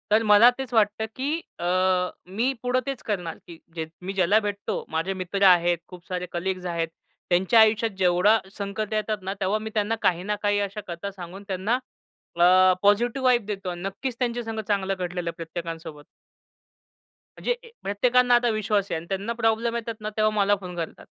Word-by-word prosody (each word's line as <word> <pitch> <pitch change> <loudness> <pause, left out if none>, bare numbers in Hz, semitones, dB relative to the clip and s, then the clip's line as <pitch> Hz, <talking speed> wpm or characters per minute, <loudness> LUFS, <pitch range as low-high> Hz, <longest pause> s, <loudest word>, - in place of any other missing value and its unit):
तर 220 +2 +4
मला 210 +4 +8
तेच 265 -2 -6
वाटतं, 215 0 +2
की 265 +2 -3 0.3
अ, 175 - -3 0.7
मी 240 +5 +2
पुढे 250 +1 +2
तेच 275 -3 -4
करणार, 180 -6 -2
की 170 - -10 0.2
जे 160 -1 -3 0.2
मी 190 +2 -4
ज्याला 195 +2 +4
भेटतो 205 0 -3
माझे 165 +4 -1
मित्र 190 +1 -2
आहेत, 175 -1 +5
खूप 180 -2 -13
सारे 180 -1 -3
कलीग्स 185 +1 -3
आहेत. 170 -2 -1 0.4
त्यांच्या 185 +6 +4
आयुष्यात 220 +1 +4
जेवढा 185 +4 +4 0.2
संकट 200 +1 -3
येतात 215 0 0
ना 190 +1 -3
तेव्हा 195 +3 +1
मी 220 +1 -5
त्यांना 215 +1 +1
काही 175 0 +2
ना 210 +2 -1
काही 205 0 +2
अशा 200 +1 -3
कथा 175 +3 -5
सांगून 190 +1 -9
त्यांना 195 +4 0 0.6
अ, 185 +1 +6
पॉझिटिव्ह 235 +6 +2
वाइब 245 -4 +4
देतो. 195 -3 -4
नक्कीच 195 +8 -4
त्यांचे 240 -1 -1
संगत 220 -1 -4
चांगलं 195 -2 0
घडलेलं 175 -1 -3
प्रत्येकांसोबत. 165 -2 -7 1.3
म्हणजे 485 - 0
अ, - - -13 0.2
प्रत्येकांना 245 +5 +3
आता 240 0 +3
विश्वास 215 -2 0
आहे - - 0
आणि 160 - -7
त्यांना 200 +4 -2
प्रॉब्लेम 230 0 0
येतात 230 -1 -5
ना 215 - -3
तेव्हा 215 0 +2
मला 205 0 +4
फोन 180 -1 -7
करतात. 165 -2 -6
200 Hz, 180 wpm, -25 LUFS, 180-220 Hz, 1.3 s, मला